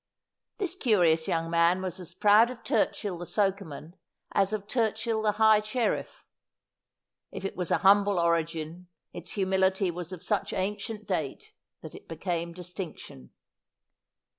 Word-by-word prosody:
This 385 Hz, -5 st, -2 dB
curious 175 Hz, -, +2 dB
young 165 Hz, 0 st, -1 dB
man 170 Hz, +2 st, +4 dB
was 185 Hz, -1 st, -4 dB
as 175 Hz, -1 st, -10 dB
proud 210 Hz, +3 st, +5 dB
of 250 Hz, -2 st, -9 dB
Turchill 190 Hz, -5 st, 0 dB
the 175 Hz, -, -5 dB
sokeman 190 Hz, -6 st, -2 dB, 0.4 s
as 195 Hz, 0 st, +2 dB
of 210 Hz, -2 st, -3 dB
Turchill 225 Hz, 0 st, 0 dB
the 210 Hz, -1 st, +2 dB
high 220 Hz, 0 st, +5 dB
sherifE. 225 Hz, +3 st, -2 dB, 1.1 s
If -, -, -6 dB
it -, -, -3 dB
was 180 Hz, -3 st, -3 dB
a -, -, +3 dB
humble 200 Hz, 0 st, +5 dB
origin 170 Hz, 0 st, -1 dB, 0.3 s
its 175 Hz, 0 st, -8 dB
humility 190 Hz, -1 st, +1 dB
was 175 Hz, 0 st, -7 dB
of 185 Hz, -1 st, -8 dB
such 205 Hz, +1 st, -1 dB
ancient 210 Hz, +2 st, -3 dB
date 160 Hz, -8 st, -3 dB, 0.3 s
that -, -, -9 dB
it -, -, -13 dB
became 170 Hz, +1 st, -3 dB
dis 180 Hz, +1 st, -10 dB
tinction. 150 Hz, -, -8 dB
190 Hz, 145 wpm, -28 LUFS, 170-210 Hz, 1.1 s, proud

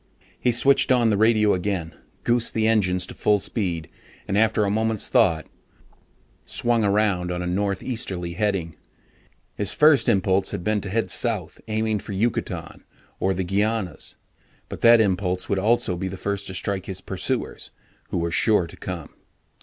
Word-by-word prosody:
He -, -, +1 dB
switched 135 Hz, +3 st, +3 dB
on 120 Hz, -3 st, +4 dB
the -, -, +2 dB
radio 110 Hz, 0 st, +4 dB
again, 90 Hz, -3 st, -2 dB, 0.3 s
goosed 120 Hz, -1 st, +1 dB
the 110 Hz, -1 st, +1 dB
engines 95 Hz, -5 st, +2 dB
to -, -, -9 dB
full 105 Hz, -1 st, +2 dB
speed, 90 Hz, -6 st, -2 dB, 0.4 s
and -, -, -1 dB
after 110 Hz, 0 st, +3 dB
a 100 Hz, -, 0 dB
moment's 110 Hz, 0 st, 0 dB
thought, 80 Hz, -3 st, +3 dB, 1.0 s
swung 120 Hz, -2 st, 0 dB
around 100 Hz, -3 st, +1 dB
on 90 Hz, 0 st, -3 dB
a -, -, -3 dB
northeasterly 95 Hz, -1 st, -2 dB
heading. 95 Hz, -4 st, -1 dB, 0.8 s
His 105 Hz, -, 0 dB
first 150 Hz, -4 st, +5 dB
impulse 95 Hz, -2 st, +2 dB
had 85 Hz, -, -4 dB
been 105 Hz, +1 st, 0 dB
to 100 Hz, -, -6 dB
head 115 Hz, +3 st, -1 dB
south, -, -, -2 dB
aiming 110 Hz, -1 st, 0 dB
for 100 Hz, -, -7 dB
Yucatan, 110 Hz, +5 st, -2 dB, 0.4 s
or 95 Hz, 0 st, +1 dB
the 95 Hz, -, -1 dB
Guianas 100 Hz, 0 st, -1 dB, 0.5 s
but -, -, -7 dB
that 115 Hz, 0 st, +7 dB
impulse 90 Hz, -2 st, 0 dB
would 100 Hz, -, 0 dB
also 105 Hz, -2 st, +1 dB
be 95 Hz, +2 st, -3 dB
the 95 Hz, +1 st, -6 dB
first 100 Hz, +1 st, -3 dB
to 95 Hz, -, -5 dB
strike 95 Hz, 0 st, -3 dB
his 95 Hz, -1 st, -4 dB
pursuers -, -, -3 dB, 0.4 s
who -, -, -2 dB
were 85 Hz, 0 st, -1 dB
sure 105 Hz, +1 st, +3 dB
to 80 Hz, -, -13 dB
come. -, -, -7 dB
100 Hz, 165 wpm, -23 LUFS, 90-110 Hz, 1.0 s, that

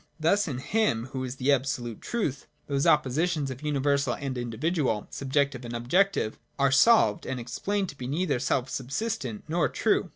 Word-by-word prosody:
Thus 190 Hz, +6 st, +2 dB
in 135 Hz, -5 st, -3 dB
Him, 145 Hz, -, 0 dB
who 130 Hz, -1 st, -2 dB
is 130 Hz, 0 st, -4 dB
the 135 Hz, +2 st, +1 dB
absolute 125 Hz, -4 st, -1 dB
truth, 155 Hz, -, -2 dB, 0.2 s
those 140 Hz, -1 st, 0 dB
oppositions 150 Hz, +1 st, +2 dB
of 130 Hz, +1 st, -8 dB
universal 140 Hz, -3 st, +1 dB
and 135 Hz, -2 st, -4 dB
individual, 125 Hz, -, -1 dB
subjective 135 Hz, -1 st, 0 dB
and 120 Hz, 0 st, -5 dB
objective, 130 Hz, -, +1 dB, 0.2 s
are 140 Hz, -1 st, +3 dB
solved 205 Hz, -, +5 dB
and 130 Hz, -1 st, -3 dB
explained 190 Hz, -, -2 dB
to 145 Hz, -, -10 dB
be 125 Hz, -, -4 dB
neither 150 Hz, -1 st, 0 dB
selfsubsistent 130 Hz, -, -2 dB
nor 165 Hz, +1 st, +1 dB
true. -, -, +1 dB
140 Hz, 160 wpm, -27 LUFS, 125-160 Hz, 0.2 s, solved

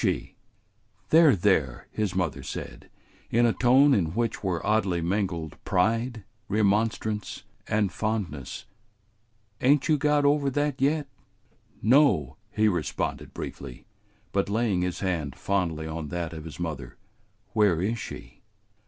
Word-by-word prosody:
"There, 160 Hz, -5 st, +7 dB
there," 85 Hz, -10 st, +1 dB
his 105 Hz, -4 st, -2 dB
mother 80 Hz, -7 st, -1 dB
said, -, -, -7 dB, 0.4 s
in 120 Hz, +1 st, +3 dB
a 115 Hz, -, +3 dB
tone 135 Hz, +3 st, +5 dB
in 85 Hz, -7 st, +1 dB
which 115 Hz, -2 st, -1 dB
were 90 Hz, -4 st, -1 dB
oddly 100 Hz, -5 st, +2 dB
mingled 85 Hz, -3 st, -2 dB
pride, 115 Hz, +4 st, 0 dB, 0.3 s
remonstrance, 105 Hz, +1 st, 0 dB, 0.2 s
and 105 Hz, -2 st, +1 dB
fondness, 100 Hz, -, -3 dB, 1.0 s
"ain't 140 Hz, +2 st, +4 dB
you 155 Hz, -3 st, +3 dB
got 150 Hz, 0 st, +2 dB
over 140 Hz, -1 st, +3 dB
that 145 Hz, 0 st, -1 dB
yet?" 145 Hz, +2 st, +2 dB, 0.8 s
"No," 110 Hz, -, +4 dB
he 110 Hz, 0 st, +2 dB
responded 85 Hz, -7 st, -2 dB
briefly, 65 Hz, -3 st, -8 dB, 0.5 s
but 100 Hz, 0 st, 0 dB
laying 105 Hz, -4 st, +1 dB
his 90 Hz, -1 st, -2 dB
hand 80 Hz, -8 st, -2 dB
fondly 85 Hz, -1 st, -1 dB
on 80 Hz, 0 st, -5 dB
that 85 Hz, +1 st, -4 dB
of 80 Hz, -1 st, -8 dB
his 80 Hz, 0 st, -9 dB
mother. 75 Hz, -7 st, -5 dB, 0.6 s
"Where 100 Hz, -6 st, +3 dB
is 110 Hz, +6 st, -1 dB
she?" -, -, -9 dB
100 Hz, 125 wpm, -27 LUFS, 85-120 Hz, 1.0 s, There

